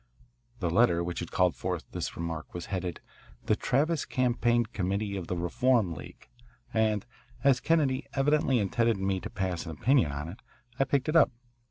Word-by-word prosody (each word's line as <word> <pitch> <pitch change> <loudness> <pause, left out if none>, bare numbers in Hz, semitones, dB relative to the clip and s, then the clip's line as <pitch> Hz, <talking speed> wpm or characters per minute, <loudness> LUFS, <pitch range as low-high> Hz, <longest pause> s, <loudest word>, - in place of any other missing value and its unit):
The 90 - +1
letter 85 -4 +4
which 85 0 -3
had 85 - -5
called 90 -2 +2
forth - - -3
this - - -4
remark 85 -1 -5
was 85 - -4
headed, 90 -2 -3 0.4
"The - - +3
Travis 150 +4 +1
Campaign 120 -1 +1
Committee 100 +2 -1
of 90 -3 -5
the 90 - -2
Reform 110 +2 +2
League," 75 - -11 0.5
and, 110 -2 +1 0.4
as 135 -2 +5
Kennedy 145 -4 +1
evidently 135 -1 +3
intended 115 +2 +1
me 95 0 0
to - - -6
pass 95 -3 -2
an - - -4
opinion 115 - +3
on 75 +2 -4
it, 90 +5 -9 0.4
I 135 - +4
picked 135 +1 0
it 155 - 0
up. 165 - +7
105 Hz, 175 wpm, -29 LUFS, 90-130 Hz, 0.5 s, up